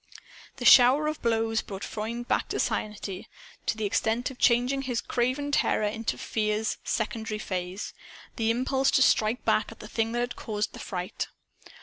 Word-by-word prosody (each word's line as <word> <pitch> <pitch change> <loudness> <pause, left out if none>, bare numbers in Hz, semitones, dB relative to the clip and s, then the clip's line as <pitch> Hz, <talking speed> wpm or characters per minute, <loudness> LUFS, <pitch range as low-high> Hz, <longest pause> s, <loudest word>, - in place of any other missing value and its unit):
The - - -6
shower 260 +4 +8
of 305 0 -2
blows 225 -1 +1
brought 195 -1 -8
Freund 230 +3 -4
back - - +1
to - - -2
sanity, 205 -3 -3 0.4
to 225 - +1
the 215 - -1
extent 225 +5 0
of 255 - -13
changing 250 +3 +3
his 250 -3 -2
craven 255 +5 -1
terror 215 -6 +2
into 225 +2 -2
Fear's 215 0 -1
secondary 220 -1 -2
phase 185 -1 -4 0.4
the 225 -1 0
impulse 265 +3 +2
to 265 - +5
strike 220 +2 +2
back 215 - +2
at 225 - -12
the 215 - -9
thing 225 +1 -1
that 240 - 0
had 245 0 -2
caused 215 0 -3
the - - -9
fright. 180 +1 -4
225 Hz, 170 wpm, -27 LUFS, 215-245 Hz, 0.4 s, shower